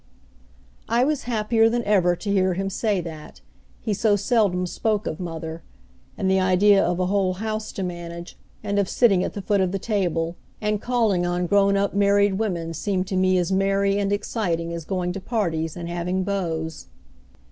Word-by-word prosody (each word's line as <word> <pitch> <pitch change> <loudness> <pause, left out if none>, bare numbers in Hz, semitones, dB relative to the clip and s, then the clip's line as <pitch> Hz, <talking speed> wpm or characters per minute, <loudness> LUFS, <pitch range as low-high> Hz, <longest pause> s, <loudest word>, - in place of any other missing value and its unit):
I 235 +2 +3
was 295 0 0
happier 225 -1 +2
than 240 +1 -1
ever 185 -4 +3
to 200 +3 -4
hear 190 -2 +2
him 195 +1 -2
say 205 -1 0
that 160 -3 -9 0.4
he 215 - -1
so 205 +1 +2
seldom 200 -4 +1
spoke 210 +3 -1
of 155 - -4
mother 165 -2 -5 0.6
and 190 - -1
the 190 0 +3
idea 190 +2 +4
of 175 +1 0
a 185 - +1
whole 190 -1 +1
house 215 +2 -4
to 195 - -4
manage, 175 -1 -6 0.3
and 200 0 0
of 200 - 0
sitting 195 -7 +3
at - - -3
the 200 - -6
foot 200 0 +2
of 185 -1 +1
the 195 - -1
table, 175 -5 -1 0.2
and 210 -1 -1
calling 225 -7 +1
on 175 0 0
grown 200 +2 +3
up 200 0 0
married 200 0 +3
women 170 -7 -2
seemed 185 +3 -1
to 190 - -2
me 185 0 +3
as 180 0 0
merry 195 +1 +2
and 200 0 0
exciting 175 -5 -1
as 165 -2 -6
going 180 -1 -2
to 195 - -6
parties, 165 -9 -2
and 170 -1 -5
having 175 +2 -2
beaus. 165 - -3
190 Hz, 190 wpm, -23 LUFS, 175-205 Hz, 0.6 s, idea